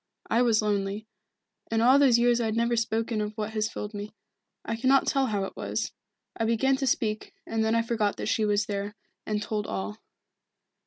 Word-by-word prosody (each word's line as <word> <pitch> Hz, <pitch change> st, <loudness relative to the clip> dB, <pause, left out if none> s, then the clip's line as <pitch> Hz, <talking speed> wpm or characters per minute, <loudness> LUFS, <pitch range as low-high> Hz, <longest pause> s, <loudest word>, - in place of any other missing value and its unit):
I 230 Hz, -, +4 dB
was 225 Hz, -3 st, +3 dB
lonely. 205 Hz, 0 st, -1 dB, 0.6 s
In 225 Hz, -, +1 dB
all 255 Hz, +4 st, +6 dB
those 265 Hz, -5 st, +6 dB
years 240 Hz, 0 st, +3 dB
I 225 Hz, -, 0 dB
have 220 Hz, -, -1 dB
never 235 Hz, +1 st, +2 dB
spoken 225 Hz, 0 st, 0 dB
of 210 Hz, +1 st, -4 dB
what 215 Hz, 0 st, -3 dB
has 215 Hz, 0 st, -1 dB
filled 210 Hz, -1 st, -6 dB
me. 205 Hz, +1 st, -7 dB, 0.5 s
I 225 Hz, -, -2 dB
cannot 260 Hz, +4 st, +3 dB
tell 270 Hz, -2 st, +2 dB
how 205 Hz, -3 st, -1 dB
it 195 Hz, -, -6 dB
was. -, -, -3 dB, 0.4 s
I -, -, -2 dB
began 230 Hz, +4 st, +2 dB
to 270 Hz, -1 st, -1 dB
speak, 215 Hz, -3 st, -1 dB
and 225 Hz, 0 st, -1 dB
then 220 Hz, +1 st, +2 dB
I 230 Hz, -, +3 dB
forgot 220 Hz, -3 st, 0 dB
that -, -, -4 dB
she 220 Hz, -, +1 dB
was 210 Hz, 0 st, +2 dB
there, 205 Hz, -1 st, -4 dB, 0.3 s
and 210 Hz, -1 st, -1 dB
told 210 Hz, -1 st, -2 dB
all." 100 Hz, +1 st, -4 dB
220 Hz, 205 wpm, -27 LUFS, 210-235 Hz, 0.6 s, all